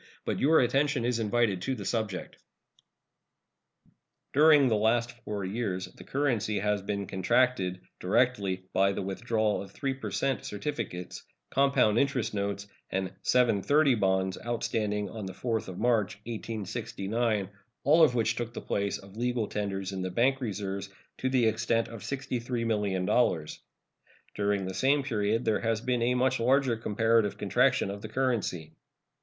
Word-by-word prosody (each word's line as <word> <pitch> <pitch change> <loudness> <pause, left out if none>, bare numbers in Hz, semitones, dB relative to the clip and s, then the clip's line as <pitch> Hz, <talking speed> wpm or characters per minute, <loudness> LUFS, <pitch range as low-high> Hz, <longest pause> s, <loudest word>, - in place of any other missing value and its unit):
But - - -1
your 160 +4 +5
attention 135 0 +1
is 120 -1 0
invited 110 -3 +1
to 130 +7 -1
the 100 -5 -7
subject. 110 -5 -3 2.0
During 150 -1 +6
the 115 - +2
last 115 +3 +2
four 105 -4 -4
years 95 -2 -2
the - - -13
currency 120 -7 0
has 105 0 0
been 100 0 -3
contracted, 95 -1 +1 0.2
directly, 100 -2 +1
by 100 +1 +3
the 100 - -3
withdrawal 110 +2 0
of 100 - -9
3 135 -2 -2
per 130 -5 -6
cent 125 +7 -1
certificates, 105 -6 -5 0.3
compound 135 -5 +3
interest 140 -6 0
notes, 100 0 -2 0.2
and 95 0 -2
"seven 120 -5 +3
thirty" 145 +3 +4
bonds 95 -3 +1
outstanding 105 -3 -1
on 105 0 -6
the 95 - -6
4th 115 +1 -2
of 90 -1 -7
March, 115 -5 +1
1869, 110 -1 -2 0.3
all 155 +4 +5
of 125 -6 +4
which 115 -2 +2
took 120 -1 -4
the - - -3
place 100 0 -1
of 100 +1 -14
legal 120 -1 0
tenders 100 -2 -3
in 95 -1 -4
the 95 - -2
bank 130 +8 +2
reserves 100 -3 -4 0.3
to 130 - 0
the 130 -3 +3
extent 115 +1 +1
of 115 -3 -9
$63,000,000. 115 - -1 0.7
During 100 -1 0
the 95 - -4
same 135 +8 +2
period 110 -2 0
there 110 -2 +2
has 115 -1 0
been 125 +1 -1
a 125 +2 +2
much 130 0 +2
larger 130 +1 +3
comparative 110 -1 +1
contraction 100 - +2
of 100 0 -7
the 110 - -7
currency. 105 -11 -1
110 Hz, 150 wpm, -29 LUFS, 100-125 Hz, 2.0 s, During